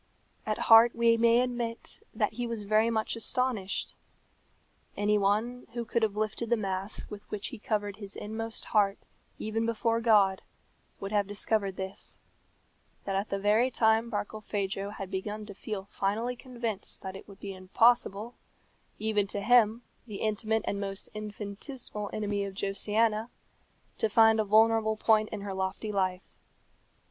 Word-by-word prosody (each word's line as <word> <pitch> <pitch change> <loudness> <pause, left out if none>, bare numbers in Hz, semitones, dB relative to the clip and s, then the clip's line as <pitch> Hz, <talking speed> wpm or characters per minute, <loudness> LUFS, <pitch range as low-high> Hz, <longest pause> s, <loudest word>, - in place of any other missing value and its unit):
At 215 - 0
heart 225 +1 +8
we 230 0 +4
may 230 +1 +5
admit 240 -2 -4
that - - 0
he 245 -1 -3
was 230 -3 -4
very 215 +2 +3
much 220 -1 -1
astonished. 225 -3 -1 1.0
Any 210 +1 +2
one 220 +5 0
who 235 -1 -3
could 235 +1 0
have 215 -2 +1
lifted 215 +2 -2
the 235 - +3
mask 195 0 -4
with 205 -1 -9
which 210 -1 -4
he - - -9
covered 205 -2 -2
his 200 -2 -7
inmost 225 +2 -5
heart 200 -3 +2 0.4
even 220 +1 -2
before 230 0 0
God 205 -4 +4 0.6
would 195 0 -5
have 205 -2 +2
discovered 205 -1 -1
this: 190 +1 -5 0.9
that 195 - -1
at 195 +2 -1
the 195 - -1
very 210 +5 +3
time 225 -1 +2
Barkilphedro 205 -2 -3
had 195 -3 -7
begun 210 +3 -4
to 205 - -9
feel 200 -1 -5
finally 215 +5 -1
convinced 240 -5 -5
that 190 0 -5
it 195 - -10
would 200 -2 -13
be 200 -1 -6
impossible 210 +3 +2 0.6
even 210 -2 +1
to 205 - -3
him, 230 +1 +4 0.2
the 210 -3 -6
intimate 220 0 0
and 200 - -2
most 195 0 -5
infinitesimal 210 +1 -5
enemy 205 -1 -1
of 195 -1 -5
Josiana 215 +3 +1 0.7
to 220 - +2
find 225 +1 +5
a 215 - +2
vulnerable 220 +1 +4
point 215 0 +3
in 215 - -5
her 200 -1 -4
lofty 190 +3 -3
life. 185 -2 0
215 Hz, 155 wpm, -29 LUFS, 200-225 Hz, 1.0 s, heart